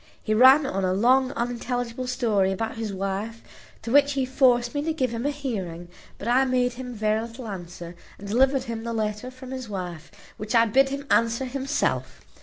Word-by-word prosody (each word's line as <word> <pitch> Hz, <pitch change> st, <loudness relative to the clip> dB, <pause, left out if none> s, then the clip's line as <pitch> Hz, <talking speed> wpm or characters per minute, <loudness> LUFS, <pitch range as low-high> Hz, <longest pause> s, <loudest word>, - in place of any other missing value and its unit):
He 215 Hz, -, 0 dB
ran 260 Hz, +6 st, +7 dB
on 195 Hz, -6 st, -2 dB
a 185 Hz, 0 st, +1 dB
long, 255 Hz, +5 st, +3 dB
unintelligible 245 Hz, 0 st, -3 dB
story 220 Hz, -7 st, +1 dB
about 220 Hz, +4 st, -3 dB
his 225 Hz, -2 st, -3 dB
wife, 195 Hz, +4 st, -4 dB, 0.4 s
to 230 Hz, -, -4 dB
which 285 Hz, +1 st, +5 dB
he 270 Hz, -1 st, 0 dB
forced 250 Hz, -2 st, +3 dB
me 290 Hz, -, -1 dB
to 320 Hz, +2 st, -1 dB
give 255 Hz, -6 st, -1 dB
him 235 Hz, +4 st, -2 dB
a -, -, +2 dB
hearing; 195 Hz, -, -5 dB, 0.3 s
but 205 Hz, -, -7 dB
I 250 Hz, +3 st, +4 dB
made 250 Hz, -1 st, +1 dB
him 250 Hz, 0 st, -7 dB
very 215 Hz, 0 st, +1 dB
little 230 Hz, +1 st, -8 dB
answer, 175 Hz, -3 st, -8 dB, 0.2 s
and 200 Hz, -, -10 dB
delivered 265 Hz, +5 st, +2 dB
him 230 Hz, -1 st, -5 dB
the 235 Hz, 0 st, -3 dB
letter 215 Hz, +2 st, -2 dB
from 255 Hz, 0 st, -11 dB
his 260 Hz, -3 st, -6 dB
wife, 180 Hz, -5 st, -6 dB, 0.3 s
which 215 Hz, +3 st, -3 dB
I 230 Hz, 0 st, +6 dB
bid 270 Hz, +5 st, +3 dB
him 280 Hz, +1 st, -5 dB
answer 230 Hz, +3 st, +2 dB
himself. 270 Hz, +2 st, -2 dB
235 Hz, 200 wpm, -25 LUFS, 210-260 Hz, 0.4 s, ran